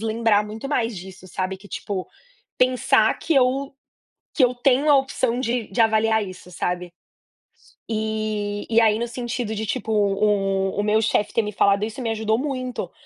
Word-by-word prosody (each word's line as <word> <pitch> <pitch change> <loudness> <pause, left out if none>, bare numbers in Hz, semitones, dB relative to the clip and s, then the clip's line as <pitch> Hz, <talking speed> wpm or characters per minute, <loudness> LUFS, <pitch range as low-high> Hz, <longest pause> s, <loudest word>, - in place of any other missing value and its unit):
lembrar 220 -1 +2
muito 220 +5 -7
mais 235 -5 0
disso 185 +1 -11
sabe 185 +1 -3
que, 195 +2 -15
tipo, 195 -2 -4 0.5
pensar 255 0 +3
que 330 - 0
eu 270 +1 +2 0.6
que 270 - +5
eu 250 - +2
tenho 270 +3 +3
a 285 - +7
opção 260 -3 0
de 240 -2 -1
de 240 - -2
avaliar 220 -1 +3
isso, 180 -1 -11
sabe. 180 0 -3 1.0
E 215 -2 -2
e 230 0 +4
aí 220 -1 +3
no 235 - -1
sentido 240 -2 -4
de, 220 +1 -3
tipo, 215 +1 -3
o 195 -2 +1
o - - +1
meu 215 +1 +2
chefe 210 -1 +1
ter 230 - +3
me 210 -1 -5
falado 200 +1 +3
isso 220 +4 -7
me 235 - -2
ajudou 220 0 0
muito, 255 -2 -4
220 Hz, 175 wpm, -23 LUFS, 205-245 Hz, 1.0 s, a